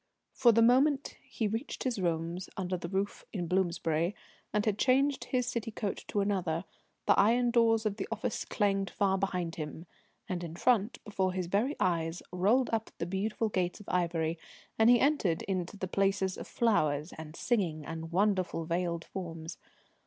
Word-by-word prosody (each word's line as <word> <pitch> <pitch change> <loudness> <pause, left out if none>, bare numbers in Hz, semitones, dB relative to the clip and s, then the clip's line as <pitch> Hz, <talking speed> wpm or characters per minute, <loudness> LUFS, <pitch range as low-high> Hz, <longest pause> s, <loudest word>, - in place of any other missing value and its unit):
For 245 -3 +5
the 230 +1 +5
moment 270 +4 +3
he 235 -4 -2
reached 225 +7 -3
his 250 -5 -1
rooms 170 +1 -2
under 185 -1 -1
the 170 -1 -5
roof 195 +1 -2
in 180 -5 -3
Bloomsbury, 170 0 0 0.4
and 210 0 +1
had 210 -2 0
changed 270 +2 +3
his 250 -1 0
city 235 -3 -2
coat 210 -2 -4
to 205 - 0
another, 185 -4 -1 0.4
the - - +6
iron 240 +4 +4
doors 225 -2 +3
of 210 -1 -1
the 195 - -3
office 225 +1 -2
clanged 195 -2 0
far 195 0 +1
behind 180 -4 -2
him, 155 +1 -6 0.4
and 175 -1 -3
in 165 -1 -6
front, 225 +2 +2
before 190 -3 0
his 185 -1 -2
very 215 - +1
eyes, 165 -1 0
rolled 210 +9 +2
up 225 0 0
the - - -2
beautiful 210 +5 -1
gates 180 -3 -1
of 210 - -13
ivory, 170 -2 0 0.4
and 220 +1 +6
he 245 0 +7
entered 265 - +2
into 185 0 -3
the 190 - -3
places 195 0 +1
of - - -8
flowers 155 -9 +1
and 160 0 -9
singing 170 -11 0
and 165 0 -6
wonderful 185 -3 +1
veiled 170 0 -1
forms. 165 -3 -6
195 Hz, 175 wpm, -31 LUFS, 170-225 Hz, 0.4 s, he